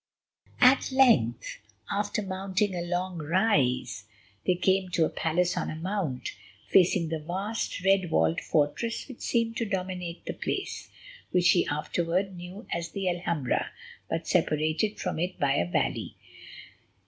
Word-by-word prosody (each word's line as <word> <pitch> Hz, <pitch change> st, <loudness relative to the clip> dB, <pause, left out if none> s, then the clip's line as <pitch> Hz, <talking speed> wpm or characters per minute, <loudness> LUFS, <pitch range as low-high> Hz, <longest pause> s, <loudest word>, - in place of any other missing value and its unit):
At 260 Hz, +1 st, +6 dB
length, 230 Hz, -, +3 dB, 0.3 s
after 205 Hz, +1 st, -1 dB
mounting 190 Hz, +1 st, -1 dB
a 175 Hz, -, -2 dB
long 175 Hz, 0 st, -2 dB
rise, 145 Hz, -, +1 dB, 0.4 s
they 180 Hz, -, +4 dB
came 190 Hz, +1 st, +1 dB
to 165 Hz, -, +4 dB
a -, -, -1 dB
palace 175 Hz, +2 st, 0 dB
on -, -, -2 dB
a -, -, -4 dB
mount, 165 Hz, -6 st, -3 dB, 0.4 s
facing 175 Hz, -2 st, +4 dB
the 160 Hz, -1 st, -2 dB
vast, 190 Hz, +4 st, -3 dB
red 190 Hz, -2 st, +3 dB
walled 80 Hz, -, +2 dB
fortress 155 Hz, +10 st, 0 dB
which 260 Hz, -4 st, -10 dB
seemed 230 Hz, -1 st, 0 dB
to 230 Hz, -, 0 dB
dominate 185 Hz, -3 st, -4 dB
the -, -, -3 dB
place, -, -, -4 dB, 0.4 s
which 180 Hz, -1 st, +4 dB
he 175 Hz, -, +3 dB
afterwards 170 Hz, +5 st, -1 dB
knew 180 Hz, +5 st, -9 dB
as 170 Hz, -1 st, -2 dB
the 195 Hz, -2 st, -3 dB
Alhambra, 170 Hz, -6 st, -1 dB, 0.4 s
but -, -, -2 dB
separated 155 Hz, +8 st, +1 dB
from 180 Hz, -4 st, -2 dB
it 180 Hz, +2 st, -2 dB
by 140 Hz, -1 st, +3 dB
a 85 Hz, -9 st, 0 dB
valley. -, -, -1 dB
180 Hz, 145 wpm, -28 LUFS, 160-195 Hz, 0.4 s, At